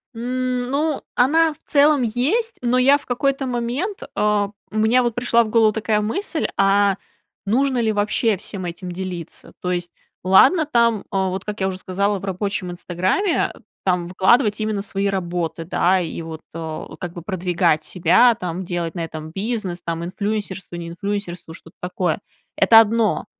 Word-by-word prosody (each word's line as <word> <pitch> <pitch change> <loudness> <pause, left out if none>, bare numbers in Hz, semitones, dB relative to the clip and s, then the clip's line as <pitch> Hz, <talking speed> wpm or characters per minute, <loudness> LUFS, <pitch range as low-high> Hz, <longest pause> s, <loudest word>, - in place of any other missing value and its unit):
М, 250 +1 -2
ну, 295 +1 0
она 315 +6 +4
в - - -24
целом 290 -1 +4
есть, 285 - 0
но 250 0 +2
я 270 +3 +5
в 285 - -15
какой-то 270 +2 0
момент, 250 - -2
а, 210 -1 +2 0.2
у - - -10
меня, 225 +4 +4
вот, 240 -1 0
пришла 240 -1 +3
в 220 - -6
голову 220 -1 +4
такая 215 0 0
мысль: 315 - -1
"А 195 0 +4 0.5
нужно 255 +5 +1
ли 225 -2 +2
вообще 210 +1 +1
всем 190 0 -6
этим 175 +1 -6
делиться?" 180 -2 -7
То 180 - -1
есть, 175 -1 -2 0.3
ладно 250 - +6
там, 235 -6 +2
а, 190 -1 +1
вот, 185 +1 -4
как 210 0 -5
я 190 - +2
уже 190 -1 -3
сказала, 200 +2 -1
в 195 - -7
рабочем 195 -1 -2
"Инстаграме", 185 - 0 0.3
там 180 -2 +1
выкладывать 210 +5 +3
именно 215 -2 -1
свои 200 0 -2
работы, 175 -4 -2
да, 180 +2 +2
и 170 -1 -4
вот, 160 -1 -7
а, 160 -1 -6
как 175 -2 -5
бы, 175 - -7
продвигать 175 -3 0
себя. 185 +10 +4
Там, 180 -4 -4
делать 175 -2 -3
на 170 - -2
этом 155 -1 -7
бизнес, 195 -2 -3
там, 170 -1 -3
инфлюенсерство, 195 0 -4
не 170 -1 -6
инфлюенсерство, 180 -2 -5
что-то 165 +1 -15
такое. 180 -1 -1 0.4
Это 225 - +7
одно. 225 0 +2
200 Hz, 170 wpm, -21 LUFS, 180-240 Hz, 0.5 s, Это